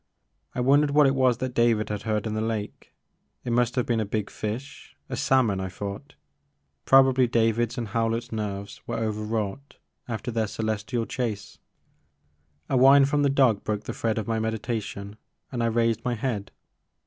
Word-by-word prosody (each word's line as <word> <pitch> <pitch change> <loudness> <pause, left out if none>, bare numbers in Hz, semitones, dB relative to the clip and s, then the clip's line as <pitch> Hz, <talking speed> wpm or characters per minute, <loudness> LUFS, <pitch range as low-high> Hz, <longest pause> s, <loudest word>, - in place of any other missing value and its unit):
I 125 - -1
wondered 140 +3 +4
what 145 +1 +5
it 135 - +4
was 130 -3 +3
that 130 0 -3
David 115 -3 +2
had 105 -1 -3
heard 110 -1 -1
in 110 - -2
the 110 - -1
lake. 110 -2 -4 0.5
It 120 - -1
must 120 0 +2
have 125 - +1
been 115 -2 0
a - - +1
big 105 0 -3
fish, 115 +6 -6
a - - -3
salmon, 115 -7 +2
I 95 0 -3
thought; 100 +1 -7 0.7
probably 130 -1 +5
David's 115 +1 +1
and 115 -3 -3
Hewlett's 115 +2 -1
nerves 100 -2 -5
were 115 - -2
overwrought 110 +3 -3 0.3
after 120 +1 -4
their 110 -1 0
Celestial 110 +2 -2
chase. 110 -5 -4 1.1
A 135 - +1
whine 135 +2 +7
from 145 +1 +1
the 140 - +3
dog 130 -6 +3
broke 105 -1 -2
the - - -5
thread 115 -1 -1
of 110 - -3
my 115 -1 0
meditation 110 -2 -4 0.3
and 120 -3 -2
I 115 - +2
raised 115 -1 +1
my 125 -1 -1
head. 105 -4 -3
115 Hz, 175 wpm, -26 LUFS, 105-125 Hz, 1.1 s, whine